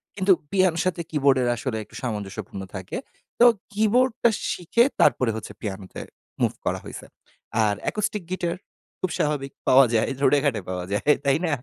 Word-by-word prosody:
কিন্তু 190 0 +2 0.2
পিয়ানোর 185 -4 +2
সাথে 180 -2 0
কীবোর্ডের 135 -4 +3
আসলে 120 -1 -3
একটু - - -17
সামঞ্জস্যপূর্ণ 105 -4 -5
থাকে। 95 -1 -5 0.4
তো, 240 - +8 0.3
কীবোর্ডটা 230 +3 +3 0.2
শিখে 180 +7 +2 0.2
তারপরে 120 -3 +4
হচ্ছে 110 - -7
পিয়ানোতে 95 -3 -6 0.4
মুভ - - +3
করা - - 0
হইছে। - - -8 0.6
আর 105 - +1
অ্যাকুস্টিক 210 -2 -1
গিটার, 175 -2 -1 0.4
খুব 185 - -1
স্বাভাবিক 140 -2 -1 0.2
পাওয়া 135 +1 +7
যায়। 110 - +2
রোডে 140 +1 +4
ঘাটে 115 -7 +1
পাওয়া 90 -1 -3
যায়। 105 +7 -2 0.2
তাই 140 +1 +4
না? 160 - 0
140 Hz, 155 wpm, -24 LUFS, -, 0.6 s, তো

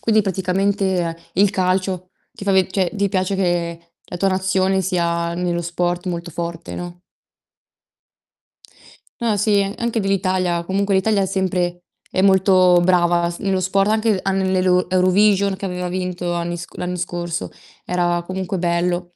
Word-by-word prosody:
Quindi 220 -2 +3
praticamente 190 -2 0 0.2
il 200 +2 +4
calcio 185 -1 -1 0.2
ti 200 - -9
fa 200 - +2
ve 190 -1 +4
cioè 185 -3 0
ti 200 -1 0
piace 185 0 0
che 170 -2 -2
la 175 - -7
tua 195 +2 +1
nazione 190 0 +1
sia 170 -2 -1
nello 175 -1 -1
sport 175 +1 -2
molto 170 -1 -4
forte, 170 +1 -5
no? 175 0 -7 2.2
No, 225 -3 +1
sì, 205 0 +2 0.2
anche 235 -1 -1
dell'Italia. 185 -3 0
Comunque 195 +2 0
l'Italia 200 +1 +2
è - - +1
sempre 180 -2 -1 0.3
è 185 - +1
molto 185 -2 +5
brava 175 -1 +3
s 175 - -6
nello 195 -1 0
sport, 195 +2 +1
anche 220 -2 +2
a 195 - 0
nell'elo 185 -1 +1
Eurovision 195 +2 +3
che 200 - -5
aveva 180 -1 -3
vinto 180 -1 -3
anni 170 0 -2
sc 170 - -10
l'anno 180 0 -3
scorso, 175 -1 -3 0.4
era 175 -1 0
comunque 185 +1 -3
bello. 175 0 -1
185 Hz, 150 wpm, -20 LUFS, 175-195 Hz, 2.2 s, molto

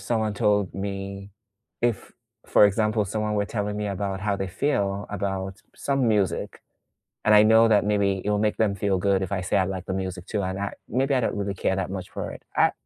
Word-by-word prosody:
someone 110 +1 -1
told 100 -2 +1
me 100 0 -5 0.5
if, 120 -3 -1 0.3
for - - +6
example, 105 +1 +2
someone 105 +2 -2
were 105 -1 +1
telling 105 -1 -3
me 105 0 -2
about 100 -1 -3
how 100 0 0
they 95 0 -3
feel 100 -1 -1
about 95 -1 -3 0.2
some 135 -3 0
music, 100 -6 0 0.6
and 105 - +4
I 105 0 +8
know 110 +1 +6
that 105 -2 +4
maybe 100 -2 +1
it - - 0
will 105 0 +2
make 105 0 +1
them 105 -3 +2
feel 100 -1 0
good 95 +1 +2
if 95 - -3
I 100 - 0
say 90 - -1
I 95 - +4
like 95 -1 -4
the - - -3
music 95 -1 -4
too, 105 - -1
and 95 +1 -3
I 100 0 -3 0.2
maybe 135 +3 +1
I 130 - +2
don't - - 0
really 100 -1 -2
care 95 0 0
that 95 -1 -2
much 95 -1 -5
for - - -5
it, - - -11
I - - +5
100 Hz, 225 wpm, -25 LUFS, 95-105 Hz, 0.6 s, I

